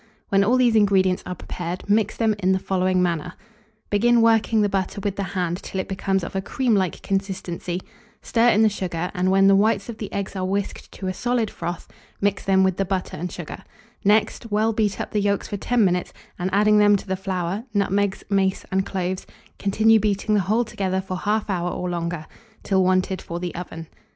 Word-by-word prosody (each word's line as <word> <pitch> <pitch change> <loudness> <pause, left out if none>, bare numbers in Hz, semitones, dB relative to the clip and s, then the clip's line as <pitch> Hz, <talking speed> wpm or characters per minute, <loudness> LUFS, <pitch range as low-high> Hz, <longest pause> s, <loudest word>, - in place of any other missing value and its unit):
When 195 0 +4
all 240 +6 +3
these 245 -3 +3
ingredients 190 -3 +3
are 180 - -4
prepared, 175 +1 -6
mix 210 0 +2
them 220 -2 +2
in 190 -1 +2
the - - +2
following 185 -1 +1
manner. 175 0 -1 0.6
Begin 235 +3 +4
working 225 -1 +3
the - - +3
butter 195 0 -2
with 200 -2 -1
the - - -3
hand 180 -2 -2
till 190 - -5
it 185 - -3
becomes 190 0 -1
of 170 - -6
a 190 - 0
cream 245 +4 0
like 190 -4 0
consistency; 190 -2 -3 0.4
stir 235 +1 +2
in 220 -1 +4
the - - +6
sugar, 180 -4 -3
and 185 -1 +1
when 195 +1 +4
the 195 0 +6
whites 205 +1 +2
of 225 - -7
the 210 - -5
eggs 200 0 -4
are 185 - -2
whisked 195 +1 -3
to 190 - -7
a 185 - -1
solid 240 +1 -1
froth, 170 0 -5 0.3
mix 200 -1 0
them 190 -1 +3
with 190 -1 +1
the 195 - +1
butter 190 -1 -2
and 180 +3 -4
sugar; - - -8 0.4
next, 215 +3 +2
well 215 +2 +1
beat 210 -2 0
up - - -4
the 210 - +1
yolks 200 0 0
for 205 - -4
10 235 +2 +2
minutes, 180 -1 0 0.3
and, 180 +1 -1
adding 210 +1 +4
them 205 0 +6
to 200 - -3
the 190 -1 -1
flour, 190 +2 -3
nutmegs, 200 -1 0
mace, 195 -1 +1
and 190 0 0
cloves, 185 0 -3 0.3
continue 220 +3 +4
beating 210 0 0
the 205 - +4
whole 215 +6 +1
together 190 -3 -2
for 190 -1 -4
1/2 210 +3 0
hour 180 -3 -1
or 180 - -3
longer, 170 -2 -3 0.4
till 190 -1 +2
wanted 185 0 +1
for 170 +1 -5
the 175 -1 -4
oven. 165 -2 -7
195 Hz, 210 wpm, -23 LUFS, 185-210 Hz, 0.6 s, the